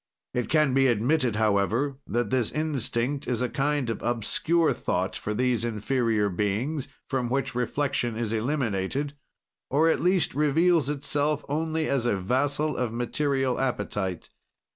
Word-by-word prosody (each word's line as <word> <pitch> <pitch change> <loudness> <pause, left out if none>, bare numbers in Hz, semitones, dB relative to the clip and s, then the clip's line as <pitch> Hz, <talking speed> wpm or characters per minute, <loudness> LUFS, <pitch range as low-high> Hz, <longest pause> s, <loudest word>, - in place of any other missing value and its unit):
"It 125 -3 -1
can 150 -4 +3
be 135 0 +4
admitted, 120 +1 +2
however, 110 +6 +1
that 120 +1 -1
this 125 -4 +1
instinct 140 -3 -1
is 125 0 0
a 125 - 0
kind 145 0 0
of 115 - -3
obscure 155 +8 +1
thought 90 +2 -2
for 105 - -3
these 125 -1 +1
inferior 115 -1 0
beings, 105 - -1 0.2
from 130 -3 -1
which 135 +1 -1
reflection 125 -1 -1
is 115 -1 -2
eliminated, 125 +2 -1 0.6
or, 155 +4 +3
at - - +2
least, 180 0 +2
reveals 150 +2 +3
itself 145 +1 -1
only 160 +2 -1
as 130 -3 +1
a 105 - +1
vassal 145 +9 0
of 125 -3 -1
material 135 +2 0
appetite. 105 -8 -2
130 Hz, 140 wpm, -26 LUFS, 115-145 Hz, 0.6 s, be